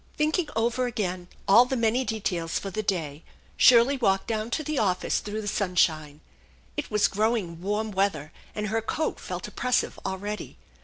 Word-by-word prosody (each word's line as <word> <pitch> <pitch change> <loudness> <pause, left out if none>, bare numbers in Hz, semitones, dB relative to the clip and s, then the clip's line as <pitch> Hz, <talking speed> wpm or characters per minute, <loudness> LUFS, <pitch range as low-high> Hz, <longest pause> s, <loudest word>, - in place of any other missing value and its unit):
Thinking 310 +2 +1
over 240 +3 +1
again 185 -6 -3 0.2
all 230 +5 +7
the 260 +1 -2
many 235 +2 +2
details 180 -8 -2
for 195 - -5
the 215 - -2
day, 165 -7 -2 0.3
Shirley 250 +3 +6
walked 195 -6 +1
down 220 0 -2
to 310 - -1
the 305 -1 -1
office 185 -3 +1
through 210 +1 -5
the 205 - -6
sunshine. 160 -7 0 0.5
It 295 - -4
was 210 -1 +3
growing 205 -6 -1
warm 210 +3 -1
weather, 190 -6 0 0.2
and 210 -1 -2
her 225 +2 0
coat 305 +8 -2
felt - - -5
oppressive 250 0 -1
already. 200 +2 -5
210 Hz, 165 wpm, -26 LUFS, 185-235 Hz, 0.5 s, all